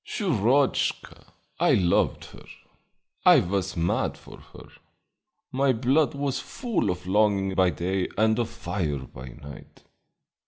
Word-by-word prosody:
"Shurochka! 135 - 0 0.3
I - - +4
loved 85 -2 +1
her; - - -14 0.8
I 180 -4 +7
was 95 -2 -2
mad 85 +1 0
for - - -14
her; - - -13 0.8
my 135 0 +2
blood 135 +6 +1
was 140 -1 -2
full 240 -5 -2
of 90 0 -4
longing 100 0 +2
by 95 -1 +3
day 90 +2 -2
and 110 +2 +2
of 120 - -1
fire 100 -10 -3
by 65 +1 -11
night. 70 +3 -13
105 Hz, 125 wpm, -25 LUFS, 90-135 Hz, 0.8 s, I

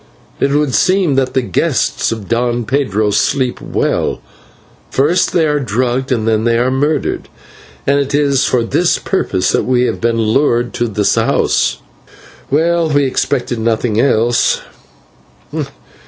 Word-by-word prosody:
It 140 - +2
would 145 -1 +1
seem 185 -2 +2
that 130 -1 0
the 130 - +2
guests 95 -7 0
of 110 -4 -5
Don 120 0 0
Pedro 110 -6 0
sleep 130 +4 0
well; - - -1 0.7
first 160 +7 +1
they 165 -2 +2
are 150 -1 +1
drugged, 125 +1 -1
then 110 -3 +1
they 115 0 +2
are 125 +2 +1
murdered; 145 +4 -1 0.6
and 140 - +2
it 140 0 -1
is 140 -2 +2
for 125 -2 +1
this 170 +9 +1
purpose 95 - -1
that - - 0
we 125 -1 +2
have - - -2
been 115 0 +1
lured 120 +2 +1
to 120 -1 -1
the 105 -2 -1 0.2
house. - - +1 0.7
Well, 165 +3 +1
we 145 -1 +2
expected 130 -2 -1
nothing 110 -1 0
else." 120 -3 +2
125 Hz, 140 wpm, -15 LUFS, 115-145 Hz, 0.7 s, It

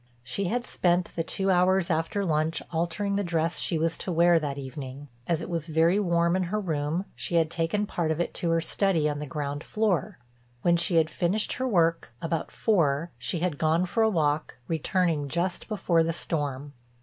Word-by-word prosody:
She 200 +10 -3
had 240 +6 -1
spent 175 0 +1
the 165 - 0
two 190 +3 0
hours 180 0 +3
after 165 +5 0
lunch 155 0 0
altering 175 +5 -1
the 205 - 0
dress 165 -1 0
she 170 - 0
was 165 +1 -1
to 185 - -3
wear 170 0 +5
that 145 -3 -3
evening. 135 +1 -7 0.2
As 170 -2 0
it - - -5
was 170 -3 -3
very 165 +4 +3
warm 170 -2 +2
in 190 - +1
her 210 +5 -1
room 160 -1 -1
she 175 - -3
had 165 -1 +3
taken 170 +5 0
part 170 -5 -2
of 160 0 0
it 175 - -1
to 170 - -2
her 165 0 +2
study 170 -2 +1
on 145 -1 -2
the 150 - -5
ground 145 +1 -4
floor. 210 -9 0 0.5
When 170 -1 +4
she 170 +1 +1
had 160 -1 +3
finished 190 +6 0
her 260 +1 -2
work—about 165 - 0
four—she 170 -3 0
had 170 -5 -1
gone 160 +3 +2
for 225 +5 0
a 220 - +5
walk 155 -5 0
returning 165 -2 0
just 175 +4 -2
before 190 -6 +2
the 165 +1 0
storm. 145 -4 -3
170 Hz, 195 wpm, -27 LUFS, 155-180 Hz, 0.5 s, wear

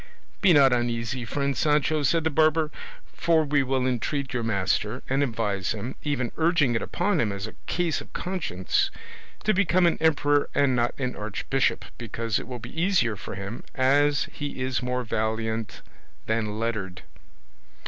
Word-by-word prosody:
"Be 195 - +6
not 140 -5 +6
uneasy, 120 +1 -1
friend 140 +3 -1
Sancho," 150 0 +2
said 160 +4 +2
the 160 - +1
barber, 155 +1 +3 0.4
"for 165 -2 +2
we 145 0 +2
will 130 -1 0
entreat 130 +2 -1
your 120 - 0
master, 105 +2 0
and 135 +2 +1
advise 110 -8 -1
him, 110 +4 -5
even 135 -5 -1
urging 160 -6 +3
it 115 - 0
upon 180 0 0
him 105 - 0
as 100 0 -4
a 110 - -8
case 170 -3 0
of - - -13
conscience, 170 - -1 0.5
to 215 - +3
become 185 -2 +3
an 170 - +2
emperor 145 -2 +3
and 140 -3 +3
not 120 0 0
an 125 -2 -2
archbishop, 110 +5 -1
because 115 -1 -2
it - - -8
will 125 -1 -5
be 160 +7 -6
easier 175 - +2
for 100 - -7
him 100 +4 -6
as 140 +2 +3
he 145 -2 -5
is 130 0 -1
more 125 0 -1
valiant 110 -1 -2 0.4
than 110 -1 -1
lettered." 105 -6 -3
130 Hz, 165 wpm, -26 LUFS, 115-150 Hz, 0.5 s, Be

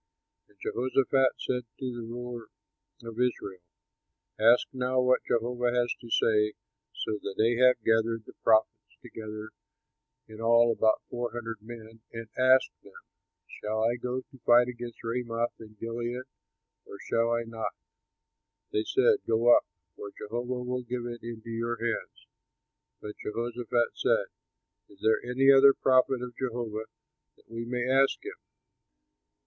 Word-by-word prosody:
And 105 - -28
Jehoshaphat 130 +1 +2
said 125 -1 -2
to 130 -2 -4
the 120 - -5
ruler 120 -1 -6 0.6
of 115 0 -8
Israel, 100 -7 -1 0.8
"Ask 115 +3 +5
now 130 0 0
what 125 0 +3
Jehovah 120 +1 0
has 120 -1 +1
to 120 - -11
say." 105 -1 +2 0.4
So 105 -1 -3 0.2
Ahab 120 +3 +5
gathered 115 0 +2
the - - -13
prophets 110 -1 +2
together 110 0 -8 0.8
(in 110 0 -11
all 115 +1 +5
about 110 -1 +2
four 120 0 -3
hundred 115 -2 -5
men), 115 0 -11
and 115 -1 -7
asked 130 +1 +4
them, - - -17 0.6
"Shall 110 +1 -1
I 120 +2 +1
go 125 +2 -3
to 130 0 -19
fight 120 +1 +6
against 120 -1 -7
Ramoth 115 0 -2
in 110 -1 -13
Gilead 120 +2 -4 0.6
or - - -10
shall 115 0 +2
I 115 0 0
not?" 115 -2 -5 1.0
They 105 - 0
said, 430 - +3
"Go 115 +2 +5
up; - - +1 0.3
for 100 - -7
Jehovah 120 +3 -4
will 125 0 -2
give 120 0 -4
it 120 -1 -6
into 115 0 -8
your 115 +1 -2
hands." 115 0 -4 0.8
But 105 0 -8
Jehoshaphat 120 +1 -1
said, - - +1 0.6
"Is 100 - -19
there 110 0 +3
any 130 +3 +4
other 135 0 +7
prophet 130 -1 +3
of 125 -1 -7
Jehovah, 115 -4 -3 0.5
that - - -27
we 115 +1 -6
may 125 +1 -2
ask 135 - +2
him?" 405 - -5
120 Hz, 145 wpm, -29 LUFS, 115-125 Hz, 1.0 s, other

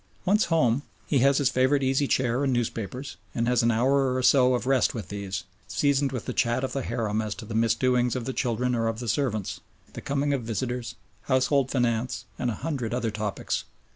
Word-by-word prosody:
Once 210 +3 +3
home, 140 -7 +2 0.2
he 140 - +2
has 140 +2 +4
his 140 - +2
favourite 130 +2 +2
easy 135 +2 +2
chair 130 +1 +1
and 135 - +1
newspapers, 120 +2 -3 0.2
and 115 0 0
has 125 0 +3
an 115 - +3
hour 130 +3 +2
or 130 - -1
so 130 -1 +5
of 125 - -3
rest 135 -1 +2
with 105 -6 -6
these, 100 -1 -4 0.2
seasoned 140 -1 +1
with 125 -4 -4
the - - -3
chat 120 +2 +1
of 130 - -2
the 135 - -1
harem 110 -3 -1
as 105 -2 -3
to - - -9
the 110 - -7
misdoings 120 +2 +2
of 125 -2 -3
the 130 - -3
children 125 0 0
or 115 -1 +1
of 115 0 -2
the 120 0 -5
servants, 110 -4 -1 0.3
the - - -7
coming 140 +1 0
of 135 - 0
visitors, 120 +2 -3 0.3
household 130 0 +2
finance, 120 -1 -1
and 125 - 0
a 115 - -2
hundred 125 -8 -2
other 115 -3 -1
topics. 105 -1 -2
125 Hz, 210 wpm, -26 LUFS, 115-135 Hz, 0.3 s, so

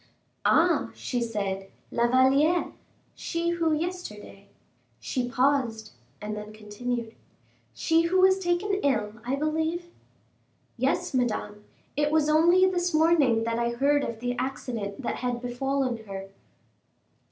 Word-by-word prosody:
"Ah!" - - +3
she 245 -2 -3
said, 200 -4 -3 0.2
"La 235 0 +2
Valliere 275 +7 +3 0.4
she 335 0 -2
who 335 -2 +1
yesterday 305 - -5 0.3
" - - -41
she 250 -2 -1
paused, 250 -4 +1 0.3
and 210 0 -5
then 210 0 -7
continued, 225 +2 -5 0.6
"she 325 0 +3
who 375 +2 +2
was 380 +1 +5
taken 380 +2 0
ill, 215 -7 0
I 250 +3 -1
believe." 320 +4 -2 0.8
"Yes, 260 +3 0
Madame; 215 -4 -2 0.3
it 295 +1 +1
was 310 -1 +2
only 340 +4 +5
this 355 -3 0
morning 310 -8 +4
that 230 0 -1
I 235 0 +1
heard 280 +3 +2
of 230 -1 -5
the 245 0 -1
accident 245 -4 -4
that - - -2
had 245 -1 -2
befallen 250 -1 -2
her." 195 -1 -7
260 Hz, 130 wpm, -27 LUFS, 225-320 Hz, 0.8 s, was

